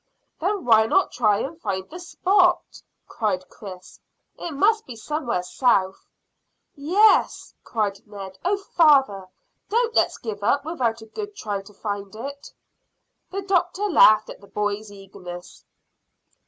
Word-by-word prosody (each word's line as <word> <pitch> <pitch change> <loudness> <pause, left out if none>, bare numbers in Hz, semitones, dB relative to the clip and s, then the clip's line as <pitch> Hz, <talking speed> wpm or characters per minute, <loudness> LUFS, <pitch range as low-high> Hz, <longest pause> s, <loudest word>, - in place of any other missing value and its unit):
"Then 385 +3 -1
why 220 -2 +5
not 385 +10 +2
try 215 -3 +2
and 325 +4 -6
find 190 -2 -3
the 350 - -10
spot?" 360 0 +1 0.3
cried 190 -4 -2
Chris. 185 -3 -11 0.4
"It - - -6
must 425 +9 +2
be 250 - -8
somewhere 240 - -3
south." 190 -2 +1 0.7
"Yes," 365 +8 +2
cried 205 -3 -2
Ned. 195 -2 -9
"Oh, 385 +3 +1
father, 275 - +3 0.4
don't 465 +1 +1
let's - - +2
give 215 -3 -6
up 280 +6 +1
without 235 -9 -2
a - - -11
good 410 - -7
try 205 - -4
to 195 +1 -16
find 200 -1 -5
it." 280 +5 -8 0.8
The 395 +1 -4
doctor 365 0 0
laughed 300 - +5
at - - -12
the 200 - -15
boy's 205 +1 -3
eagerness. 190 -3 -11
235 Hz, 140 wpm, -23 LUFS, -, 0.8 s, why